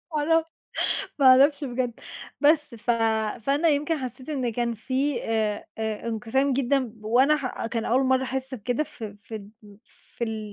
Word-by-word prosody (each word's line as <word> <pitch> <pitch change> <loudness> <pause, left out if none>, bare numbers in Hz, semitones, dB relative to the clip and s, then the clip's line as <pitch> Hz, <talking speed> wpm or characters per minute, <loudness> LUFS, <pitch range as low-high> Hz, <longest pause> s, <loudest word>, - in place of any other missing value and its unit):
ما - - +2
اعرف 325 +2 +3 0.7
ما 275 - +4
اعرفش 280 +3 +6
بجد، 245 -2 -3 0.4
بس 295 -3 +3
ف 235 +2 -3 0.5
فأنا 285 +7 +2
يمكن 300 +2 +1
حسيت 255 +1 -6
إن 255 -6 -1
كان 235 0 -1
في 260 +4 -1
أ 215 -2 0 0.2
أ 220 +1 -3
انقسام 245 +5 0
جدًا 275 +1 +2
ب 230 -4 -7
وأنا 260 +7 +4
ح 255 -5 -4
كان 230 -1 -2
أول 255 +3 +2
مرة 260 0 +3
أحس 265 +1 -3
بكده، 245 +5 -1
ف 235 - -9 0.2
فد 205 -1 -9 0.7
في 220 -3 -4
255 Hz, 160 wpm, -25 LUFS, 225-280 Hz, 0.7 s, اعرفش